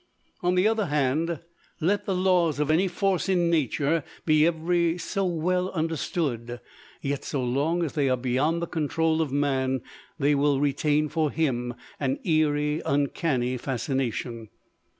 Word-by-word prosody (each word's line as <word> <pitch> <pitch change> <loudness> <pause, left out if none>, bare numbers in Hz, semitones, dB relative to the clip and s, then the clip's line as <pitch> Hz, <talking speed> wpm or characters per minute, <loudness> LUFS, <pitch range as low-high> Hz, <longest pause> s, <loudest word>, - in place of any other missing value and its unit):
On 180 +1 +1
the 185 +3 +4
other 220 -3 +1
hand, 150 +3 0 0.4
let 200 +5 +1
the 195 - +1
laws 180 -5 +2
of 150 0 +1
any 175 +5 +3
force 190 0 0
in 175 -3 +2
nature 150 0 +1 0.2
be 155 0 +5
every 170 +1 +1
so 195 +2 -2
well 180 +2 0
understood: 150 -7 -2 0.4
yet, 140 0 -2
so 135 -3 -2
long 145 +8 0
as 155 - -3
they 145 -4 +1
are 130 - +2
beyond 135 +7 0
the - - +1
control 160 0 0
of 155 -4 -1
man, 135 -2 0 0.4
they 145 -1 +2
will 140 -1 +2
retain 145 +2 +1
for 155 0 0
him 125 -6 -1 0.2
an 275 - 0
eerie 150 -2 +1
uncanny 135 -3 0
fascination. 120 -3 -3
155 Hz, 150 wpm, -26 LUFS, 135-170 Hz, 0.4 s, be